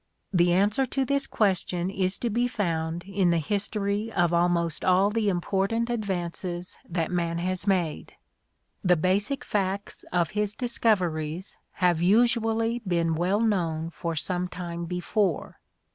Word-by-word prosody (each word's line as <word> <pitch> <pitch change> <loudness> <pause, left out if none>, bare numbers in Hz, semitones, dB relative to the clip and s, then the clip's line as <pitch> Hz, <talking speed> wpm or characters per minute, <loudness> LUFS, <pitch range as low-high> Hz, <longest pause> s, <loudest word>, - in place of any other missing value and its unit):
The 175 -1 +4
answer 205 +9 +3
to 270 +2 0
this 280 +1 0
question 185 -3 0
is 190 -1 -1
to 235 - -2
be 240 +3 +2
found 170 -6 -2
in 195 -2 +1
the 170 - +3
history 205 +4 -1
of 175 -4 +2
almost 170 -1 +1
all 190 +2 +4
the 220 -1 +1
important 195 +6 0
advances 180 -4 -3
that 170 -1 -1
man 170 -1 0
has 185 +3 -2
made. 180 -6 0 0.7
The 180 -2 +5
basic 200 - 0
facts 200 0 -2
of 175 -2 +1
his 210 0 -1
discoveries 185 -8 0 0.2
have 175 -3 +2
usually 225 +3 +3
been 170 -6 0
well 180 +6 +1
known 165 -7 0
for 165 +1 -4
some 180 +3 -1
time 170 -1 -5
before. 180 +1 -1
185 Hz, 140 wpm, -27 LUFS, 170-210 Hz, 0.7 s, The